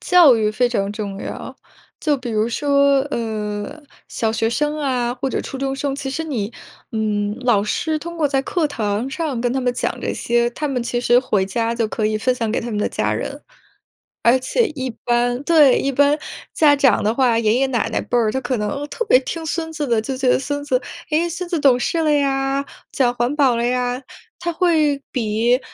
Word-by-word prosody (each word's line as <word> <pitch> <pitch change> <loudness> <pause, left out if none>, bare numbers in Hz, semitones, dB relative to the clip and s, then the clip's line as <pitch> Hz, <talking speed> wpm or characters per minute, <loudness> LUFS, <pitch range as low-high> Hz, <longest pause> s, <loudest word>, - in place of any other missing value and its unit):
教 355 - +6
育 215 -1 +1
非 245 +3 +1
常 200 -4 -1
重 200 -2 -5
要。 - - -7 0.4
就 300 -3 +1
比 250 -2 -6
如 215 +1 +1
说， 280 +1 +3
呃， 215 +4 -4 0.3
小 220 -1 -1
学 225 0 0
生 295 +5 -1
啊 250 -4 0
或 265 +2 -3
者 - - -2
初 270 - -7
中 270 0 -2
生， 275 -1 -2
其 275 -1 -5
实 320 +4 -3
你， 230 -9 -3 0.4
嗯， 210 -1 -1
老 235 -5 +3
师 310 +8 -1
通 340 +2 -7
过 310 -3 +2
在 270 -1 +1
课 315 +3 0
堂 220 -3 -2
上 295 -5 -2
跟 245 0 +1
他 265 - 0
们 250 -1 0
讲 - - -2
这 - - -2
些， 235 0 +1
他 300 +5 -4
们 255 -4 -1
其 240 0 -2
实 240 0 +4
回 210 -7 +1
家 230 +4 -1
就 230 -2 0
可 215 0 -1
以 215 0 0
分 250 +4 +1
享 230 -3 -2
给 225 - 0
他 240 0 -4
们 210 - -2
的 - - 0
家 - - -1
人。 - - -4 0.8
而 240 +2 +5
且 445 - +1
一 260 -2 -3 0.2
般 245 +1 +1
对， 300 -6 +5
一 275 - 0
般 285 +3 +3 0.3
家 295 -2 +5
长 270 -6 +3
的 215 +2 +2
话， 245 -4 +3
爷 215 -1 +2
爷 270 +2 +2
奶 235 -3 -1
奶 - - -1
辈 245 - -3
儿 225 -2 +2
就 265 - -2
可 245 0 -1
能 210 +8 -3
特 470 - -2
别 335 - +6
听 325 +5 -5
孙 320 +1 -3
子 300 -3 -3
的， 230 -2 +2
就 260 +3 -4
觉 260 -1 -1
得： - - +5
“孙 285 +2 -3
子， 255 -3 +1 0.3
诶， 330 +3 +1
孙 350 +1 -5
子 345 - 0
懂 255 -3 +5
事 335 - -1
了 305 -1 +2
呀， 275 -1 +1 0.3
讲 250 -3 +2
环 240 +4 0
保 265 -5 +3
了 235 +1 0
呀。” 250 +1 -1 0.4
他 345 0 -2
会 310 -5 +2
比， 235 +1 +1
255 Hz, 235 characters per minute, -20 LUFS, 230-285 Hz, 0.8 s, 教